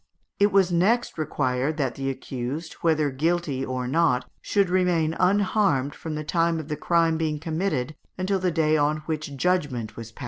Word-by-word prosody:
It 205 0 +4
was 190 -2 +4
next 195 +4 +1
required 140 -1 -1
that 135 -5 0
the 135 0 -3
accused, 135 +4 -5
whether 155 -3 +2
guilty 155 -1 0
or 130 -1 -3
not, 135 -3 +2 0.2
should 200 -2 +1
remain 175 -3 +1
unharmed 185 -7 +2
from 160 -1 -6
the 155 - -3
time 165 +1 +1
of 155 -1 -7
the 150 - -1
crime 165 +1 +2
being 155 -2 0
committed 155 -3 -2 0.2
until 190 +1 0
the 185 0 +1
day 155 -2 +2
on 150 +1 +1
which 155 -2 -4
judgment 135 - 0
was 115 -1 -8
passed. 115 - -19
155 Hz, 175 wpm, -25 LUFS, 140-175 Hz, 0.2 s, It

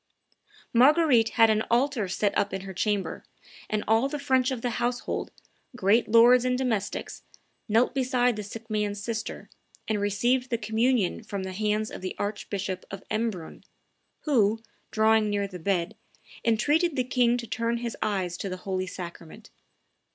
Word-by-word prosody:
Marguerite 255 -2 +5
had 225 -1 +6
an 215 0 +2
altar 240 -3 +1
set 200 +2 0
up 205 -1 0
in 190 - -4
her 195 0 -8
chamber; 205 +1 -1 0.5
and 215 -1 -1
all 225 +5 +3
the 295 - -3
French, 260 -2 +2
of 255 -4 -4
the 245 - 0
household, 245 +1 -2 0.5
great 220 +1 +3
lords 235 +3 +6
and 250 0 +1
domestics, 230 -7 -2 0.5
knelt 230 +4 +3
beside 250 -2 +1
the 210 - -4
sick 225 +3 -9
man's 210 -2 -1
sister, 220 +1 -5 0.4
and 215 -2 0
received 240 +6 +1
the 235 - 0
communion 220 -1 +1
from 200 -3 -5
the, 190 0 -5
hands 215 +2 -1
of - - -8
the 185 - -4
Archbishop 200 -2 -4
of 195 -1 -8
Embrun, 215 -7 -3 0.6
who, 225 -6 +2 0.3
drawing 220 0 +3
near 205 -1 0
the 185 -2 -9
bed, 175 -1 -1 0.5
entreated 295 +9 +2
the 255 - +1
king 245 -1 +2
to 240 - -5
turn 230 +1 -1
his 235 -1 -4
eyes 190 -5 -1
to 195 - -4
the 185 - -4
holy 185 -1 -2
sacrament. 180 +4 -9
220 Hz, 160 wpm, -27 LUFS, 200-245 Hz, 0.6 s, had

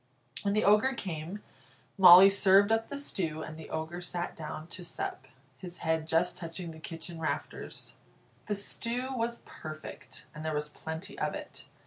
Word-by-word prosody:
When 200 0 0
the 215 - +2
Ogre 210 +6 +5
came, 180 0 -5 0.5
Molly 185 0 +10
served 200 +1 +5
up 225 0 +2
the 280 - -5
stew, 165 - -3
and 155 - -7
the 160 -1 -10
Ogre 160 +3 -4
sat 175 0 -4
down 155 -1 -6
to 180 - -6
sup, 375 - -4 0.3
his 180 -2 -8
head 160 -1 +1
just 165 +2 +1
touching 170 0 -6
the 160 - -11
kitchen 165 0 -7
rafters. 160 - -4 0.5
The 210 - 0
stew 235 +5 -2
was 235 -1 -2
perfect, 155 0 -9
and 150 - -8
there 160 -1 -1
was 150 0 -2
plenty 160 +3 -7
of - - -1
it. - - -9
175 Hz, 165 wpm, -30 LUFS, 160-205 Hz, 0.5 s, Molly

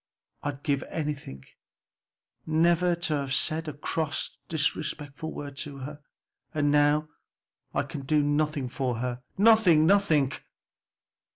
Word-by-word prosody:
I'd 145 -1 -4
give 140 -2 +1
anything 145 - -4 1.0
never 170 +2 +3
to 170 -2 -1
have 135 -1 -1
said 160 +1 +1
a 155 - -3
cross 155 +1 -2
or - - -30 0.2
disrespectful 155 0 -2
word 145 -1 -7
to 140 -1 -5
her. 145 +3 -8 0.5
And 145 -1 +2
now 150 +1 +3 0.7
I - - +2
can 145 - -6
do 150 0 +3
nothing 145 -1 0
for 125 -1 -2
her! 125 +1 -3 0.2
nothing, 200 -7 +6
nothing!" 165 -8 +4
150 Hz, 125 wpm, -27 LUFS, 140-160 Hz, 1.0 s, nothing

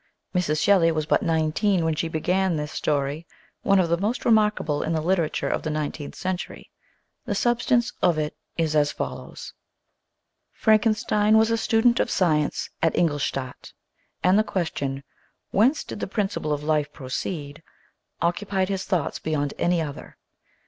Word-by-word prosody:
Mrs. 155 -5 +1
Shelley 175 -2 +4
was 155 -1 -1
but - - +2
nineteen 165 +3 +1
when 160 - +1
she 160 +2 -2
began 180 +3 0
this 150 0 -3
story, 145 +2 -1 0.3
one 195 0 +3
of 180 - +3
the 170 +1 +1
most 215 +6 -2
remarkable 210 -9 +2
in 160 - -1
the 160 - +1
literature 170 -1 0
of - - -1
the 155 - -3
nineteenth 150 -1 -4
century. 185 -1 -5 0.5
The - - -2
substance 240 0 +1
of 175 -3 +3
it 150 -1 -2 0.2
is 160 -2 0
as 145 -1 +3
follows: - - -6 1.0
Frankenstein 215 -1 +3
was 220 +1 +3
a - - +3
student 225 +1 +3
of - - +1
science 155 -5 +1
at 165 - +2
Ingolstadt, 145 -5 -2 0.5
and 185 +3 +5
the - - +4
question 140 -9 -3 0.2
" - - -47
Whence 255 +9 +3
did - - -8
the - - -3
principle 195 -6 -2
of 145 0 -1
life 150 -1 0
pro 135 - -11
ceed?" 145 +2 -4 0.6
occupied 190 +2 0
his 195 -1 -2
thoughts 180 -6 -1
beyond 145 -2 -1
any 175 -1 +2
other. 145 -2 -8
170 Hz, 160 wpm, -24 LUFS, 150-200 Hz, 1.0 s, and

